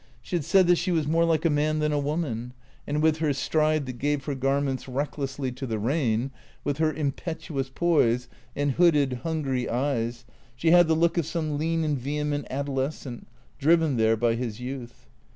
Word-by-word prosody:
She 150 - -5
had 170 - 0
said 190 +5 +4
that 175 0 +4
she 180 +2 -1
was 160 -3 +1
more 165 +3 +2
like 165 0 +1
a - - +5
man 150 +1 +1
than 150 0 +1
a 145 - +1
woman; 140 -5 -2 0.3
and 150 +1 0
with 160 -1 +4
her 155 -2 +1
stride 155 +1 +1
that 125 -2 -7
gave 145 0 0
her 145 - -2
garments 135 0 -1
recklessly 135 0 -3
to 130 +2 -6
the 110 -2 -2
rain, 120 +1 0 0.3
with 145 +1 -2
her 160 -1 +3
impetuous 145 -1 -3
poise, 130 -6 +2 0.3
and 145 0 +1
hooded, 145 -6 +3
hungry 135 -5 -1
eyes, 120 -2 -1 0.3
she 160 +7 +2
had 175 -1 +7
the 160 - +3
look 170 +2 +2
of 160 - -2
some 155 -2 -2
lean 165 +1 0
and 150 -3 0
vehement 145 +2 -2
adolescent, 135 -2 -3 0.3
driven 160 -1 +3
there 110 -1 +3
by 115 +1 +2
his 115 -2 -4
youth. 125 -1 -7
145 Hz, 190 wpm, -26 LUFS, 130-160 Hz, 0.3 s, had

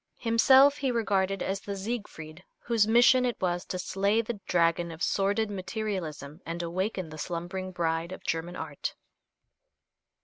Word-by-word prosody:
Himself 265 +5 +5
he 275 - -1
regarded 195 -5 0
as 195 +1 -2
the 200 0 -6
Siegfried 190 -6 -6
whose 230 -3 +1
mission 240 +3 +6
it 245 -1 -1
was 175 -1 -1
to 185 - -4
slay 200 +4 +1
the 230 -1 -3
dragon 170 0 +2
of 165 +3 -6
sordid 205 +2 +1
materialism 185 -6 -4
and 170 +1 -4
awaken 185 +1 -2
the 155 0 -9
slumbering 180 +3 -4
bride 165 -1 -1
of 185 - -8
German 165 +2 -2
art. - - -5
190 Hz, 145 wpm, -28 LUFS, 170-220 Hz, -, mission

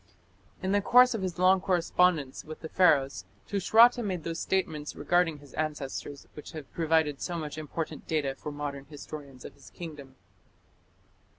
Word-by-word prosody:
In 190 - 0
the 205 0 +3
course 250 +4 +6
of 225 - -3
his 185 -2 -3
long 185 +1 +4
correspondence 175 -6 +1
with 155 0 -10
the 160 - -7
Pharaohs, 145 -8 +3 0.2
Tushratta 225 +5 +5
made 185 -6 -3
those 165 0 -4
statements 160 -6 -2
regarding 175 -3 +1
his 145 -1 -16
ancestors 145 -2 -4
which 150 - -10
have 155 -4 -9
provided 160 -3 +1
so 175 -1 -3
much 155 -2 -5
important 155 +1 -5
data 150 -4 0
for 150 +2 -7
modern 145 -1 -5
historians 140 -2 -10
of - - -9
his - - -16
kingdom. 150 -6 -9
160 Hz, 160 wpm, -29 LUFS, 145-180 Hz, 0.2 s, course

